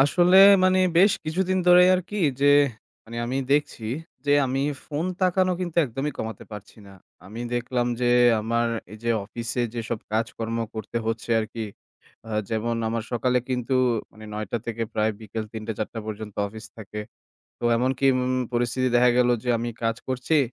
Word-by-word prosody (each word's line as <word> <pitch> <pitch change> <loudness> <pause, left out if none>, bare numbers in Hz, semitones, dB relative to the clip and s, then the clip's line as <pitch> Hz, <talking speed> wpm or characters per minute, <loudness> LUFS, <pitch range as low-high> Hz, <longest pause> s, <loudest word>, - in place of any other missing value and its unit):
আসলে, 175 +6 +4 0.3
মানে, 185 0 +4 0.2
বেশ 195 +2 +6
কিছুদিন 185 +4 0
ধরেই 180 0 +7
আর 185 - +1
কি 210 - -3 0.2
যে, 140 - +3 0.6
মানে, 115 +1 -9
আমি 130 +2 -2 0.2
দেখছি 145 -6 0 0.4
যে 145 - +4
আমি 130 +1 -1 0.3
ফোন 150 +2 -3 0.2
তাকানো 185 0 +2
কিন্তু 175 -3 -4
একদমই 135 +4 -3
কমাতে 110 -2 -5
পারছি 105 -1 -10
না। 100 - -13 0.3
আমি 110 +4 -8
দেখলাম 120 0 -1
যে, 120 -1 +2 0.3
আমার 115 +2 0 0.2
এই 110 - -9
যে 115 - +1
অফিসে 115 +3 -3
যেসব 115 -1 -3
কাজকর্ম 115 +1 -2 0.2
করতে 110 +1 -6
হচ্ছে 115 +1 -3
আর - - -2
কি, 115 -1 -3 0.6
আ - - -7 0.2
যেমন 115 +1 -1
আমার 115 0 -2
সকালে 125 +2 +1
কিন্তু, 125 0 -1 0.4
মানে, 110 0 -13
৯টা 110 +2 -3
থেকে 115 0 -3
প্রায় 110 +1 +1
বিকেল 110 +1 -5
৩টা-৪টা 110 0 -5
পর্যন্ত 110 -1 -6
অফিস 110 +2 -10
থাকে। 105 -1 -7 0.6
তো - - -11
এমনকি, 130 +2 0
উম 130 0 0 0.2
পরিস্থিতি 120 +2 0
দেখা 125 0 +5
গেল 125 -1 +4
যে, 125 - -3
আমি 120 +1 -3
কাজ 115 0 +1
করছি। 130 +4 0
120 Hz, 165 wpm, -24 LUFS, 110-135 Hz, 0.6 s, ধরেই